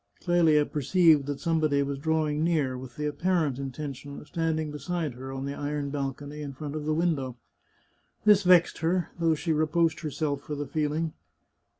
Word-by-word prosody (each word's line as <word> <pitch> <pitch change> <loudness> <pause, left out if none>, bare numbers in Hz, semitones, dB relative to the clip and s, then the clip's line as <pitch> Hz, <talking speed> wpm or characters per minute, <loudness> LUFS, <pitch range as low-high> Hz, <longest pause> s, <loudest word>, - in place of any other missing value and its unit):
Clelia 165 -4 +4
perceived 155 0 +3
that 145 -1 -3
somebody 155 -4 +2
was 140 0 -3
drawing 155 0 0
near, 155 -6 +1
with 125 -1 -9
the 150 - -3
apparent 150 -2 0
intention 140 +1 -6
of - - -13
standing 160 -2 -1
beside 160 -1 -3
her 130 +2 -8
on 135 0 -4
the 140 - -3
iron 145 0 -3
balcony 145 +1 -4
in 140 -2 -5
front 145 +2 -6
of 150 -1 -4
the 155 - +1
window. 145 -7 0 0.9
This 210 -2 +7
vexed 180 -2 +5
her, 170 +2 0
though 165 -1 +3
she 160 +2 -1
reproached 155 +2 +2
herself 150 -2 -2
for 150 - -5
the 145 0 -3
feeling. 155 +2 -1
150 Hz, 175 wpm, -28 LUFS, 140-165 Hz, 0.9 s, This